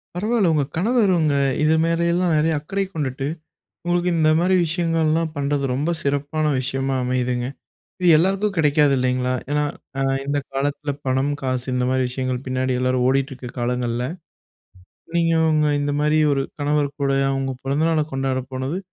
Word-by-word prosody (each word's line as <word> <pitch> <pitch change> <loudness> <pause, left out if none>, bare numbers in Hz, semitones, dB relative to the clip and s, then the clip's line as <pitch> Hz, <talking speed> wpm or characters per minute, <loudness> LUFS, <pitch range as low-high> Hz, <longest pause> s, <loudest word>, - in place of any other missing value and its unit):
பரவாயில்ல. 210 0 +1
உங்க 150 -2 +2
கணவர் 215 +2 +2
அவுங்க 155 -4 +2 0.3
இது 155 +1 +4
மேல 165 0 +1
எல்லாம் 175 -1 +1
நெறைய 160 +2 +2
அக்கறை 195 +6 -2
கொண்டுட்டு, 135 -3 -3 0.6
உங்களுக்கு 175 +1 +1
இந்த 155 -1 +4
மாதிரி 185 +2 +3
விஷயங்கள்லாம் 165 -1 0
பண்றது, 140 0 -1
ரொம்ப 145 +6 0
சிறப்பான 145 +2 -1
விஷயமா 135 +1 -2
அமையுதுங்க. 125 -1 -1 0.5
இது 180 - +3
எல்லாருக்கும் 195 +5 +1
கிடைக்காது 150 -2 +4
இல்லேங்களா! 125 0 0 0.2
ஏன்னா, 150 0 +1 0.3
அ - - 0 0.3
இந்த 145 0 0
காலத்தில, 145 +2 -2
பணம், 130 +2 +1
காசு, 130 -1 -2
இந்த 125 0 +1
மாதிரி 130 0 +1
விஷயங்கள் 130 0 -3
பின்னாடி 130 0 -1
எல்லாரும் 130 0 +1
ஓடிட்டிருக்க 135 -2 -1
காலங்கள்ல, 120 0 -1 1.1
நீங்க 165 -1 +2 0.2
உங்க 155 -1 +2
இந்தமாரி 145 +2 +1
1 135 -1 0 0.2
கணவர் 145 -1 0
கூடயும், 135 -1 +1
அவுங்க 135 -1 -2
பிறந்த 140 +4 0
நாள 160 -2 +2
கொண்டாட 135 -1 -1
போனது, 130 +6 -3
145 Hz, 150 wpm, -22 LUFS, 130-160 Hz, 1.1 s, இது